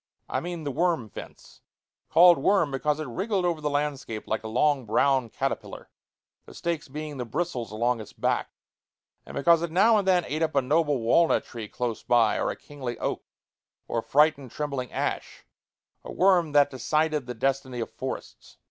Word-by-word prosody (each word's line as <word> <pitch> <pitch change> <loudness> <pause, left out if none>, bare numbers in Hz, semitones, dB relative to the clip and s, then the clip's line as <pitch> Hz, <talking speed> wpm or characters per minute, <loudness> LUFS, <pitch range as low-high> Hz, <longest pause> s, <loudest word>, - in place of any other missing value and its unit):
I - - -1
mean 175 -2 -5
the 145 - -2
worm 160 -6 0
fence - - -12 0.5
called 175 -2 +7
worm 170 -1 +2
because 145 +3 -1
it 155 - -3
wriggled 190 - -1
over 170 -3 -1
the 150 - -1
landscape 145 -6 -3
like 110 0 -2
a - - -5
long 135 +4 +2
brown 130 +2 +2
caterpillar, - - -4 0.6
the - - -13
stakes 170 -3 -3
being 150 +1 -6
the 125 - -3
bristles 120 - -3
along 120 +2 0
its 105 - -11
back, - - -1 0.8
and - - -9
because 165 +3 +4
it 170 - -2
now 210 +7 +4
and 195 - -3
then 180 -3 +3
ate 155 +2 -3
up 160 -2 0
a 140 - +4
noble 145 -1 +1
walnut 165 +9 +3
tree 115 -3 -7
close 120 0 -3
by, 115 -3 +3
or - - 0
a - - -3
kingly 130 -5 -7
oak, - - -2 0.7
or 115 - -1
frightened, 145 0 +2
trembling 140 -2 -4
ash - - -4 0.6
a - - -8
worm 180 -4 +3
that 145 -1 +5
decided 150 +1 0
the 125 - -5
destiny 130 0 -1
of 115 - -4
forests. - - -7
145 Hz, 180 wpm, -26 LUFS, 125-165 Hz, 0.8 s, called